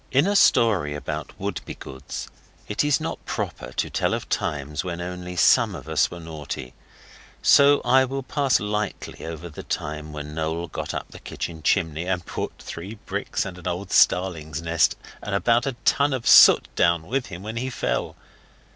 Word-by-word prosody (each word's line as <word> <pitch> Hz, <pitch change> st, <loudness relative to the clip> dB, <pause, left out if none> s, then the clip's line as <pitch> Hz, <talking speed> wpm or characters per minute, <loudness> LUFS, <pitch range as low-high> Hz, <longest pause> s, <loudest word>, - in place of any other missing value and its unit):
In 140 Hz, +4 st, +4 dB
a 205 Hz, +1 st, +1 dB
story 100 Hz, -, +4 dB
about 75 Hz, -, -5 dB
Wouldbegoods 65 Hz, -, -6 dB, 0.4 s
it 105 Hz, -, 0 dB
is 145 Hz, -1 st, +2 dB
not -, -, -5 dB
proper -, -, -4 dB
to -, -, -1 dB
tell -, -, +1 dB
of -, -, -6 dB
times 75 Hz, +2 st, -2 dB
when 90 Hz, -2 st, -4 dB
only 90 Hz, 0 st, -6 dB
some 85 Hz, -, +4 dB
of -, -, -9 dB
us 80 Hz, -1 st, +2 dB
were 85 Hz, -, -8 dB
naughty, 75 Hz, -6 st, -7 dB, 0.7 s
so 140 Hz, 0 st, +6 dB
I 130 Hz, +1 st, +5 dB
will 135 Hz, +1 st, -4 dB
pass 135 Hz, -1 st, +1 dB
lightly 105 Hz, 0 st, -4 dB
over 80 Hz, +1 st, -6 dB
the 80 Hz, -, -9 dB
time 75 Hz, 0 st, -4 dB
when 75 Hz, 0 st, -7 dB
Noel 80 Hz, +2 st, -2 dB
got -, -, -5 dB
up -, -, -5 dB
the -, -, -11 dB
kitchen 80 Hz, -2 st, -6 dB
chimney 80 Hz, +1 st, +1 dB
and 90 Hz, -2 st, -1 dB
brought -, -, -4 dB
three 95 Hz, +6 st, -7 dB
bricks -, -, -2 dB
and 90 Hz, -1 st, -7 dB
an 90 Hz, -, -7 dB
old 90 Hz, +2 st, -3 dB
starling's 80 Hz, -5 st, +2 dB
nest 85 Hz, -1 st, +2 dB, 0.3 s
and 105 Hz, -, -3 dB
about 120 Hz, +5 st, +2 dB
a 135 Hz, -, -1 dB
ton 140 Hz, 0 st, +3 dB
of 130 Hz, -3 st, -3 dB
soot -, -, +8 dB
down 85 Hz, -2 st, +2 dB
with 130 Hz, +7 st, -2 dB
him 90 Hz, 0 st, -8 dB
when 110 Hz, +2 st, -5 dB
he 130 Hz, +2 st, -2 dB
fell. -, -, -2 dB
90 Hz, 180 wpm, -24 LUFS, 80-115 Hz, 0.7 s, soot